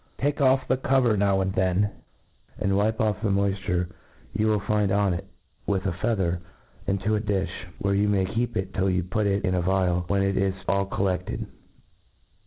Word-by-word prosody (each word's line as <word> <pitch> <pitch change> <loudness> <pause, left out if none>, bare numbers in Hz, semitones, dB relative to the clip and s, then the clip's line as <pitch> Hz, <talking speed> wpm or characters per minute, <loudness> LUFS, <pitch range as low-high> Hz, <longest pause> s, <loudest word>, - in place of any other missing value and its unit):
Take 145 +2 0
oflF 130 -2 +3
the 130 - +1
cover 130 -4 +3
now 100 -1 +2
and 95 0 -1
then, 95 +2 +1 0.7
and 95 0 +1
wipe 110 +3 +1
off 105 -2 +1
the 110 - 0
moifture 100 -2 0 0.4
you 110 +1 +1
will 105 -1 +3
find 105 0 +1
on 100 -2 +2
it, 85 - -5 0.4
with 95 -1 0
a 95 - +1
feather, 90 -2 0 0.5
into 100 +2 +1
a - - +1
difh, 100 -3 0 0.3
where 100 -1 0
you 100 +1 +2
may 100 -2 +2
keep 115 +5 -2
it 95 0 -3
till 95 0 +1
you 90 -1 +1
put 105 +4 0
it 100 0 +1
in 90 - +1
a 90 - +1
vial, 90 -1 +1
when 100 0 +2
it 100 0 0
is 95 -1 +1
all 100 0 +1
coUefted. 95 -2 -1
100 Hz, 195 wpm, -26 LUFS, 95-105 Hz, 0.7 s, oflF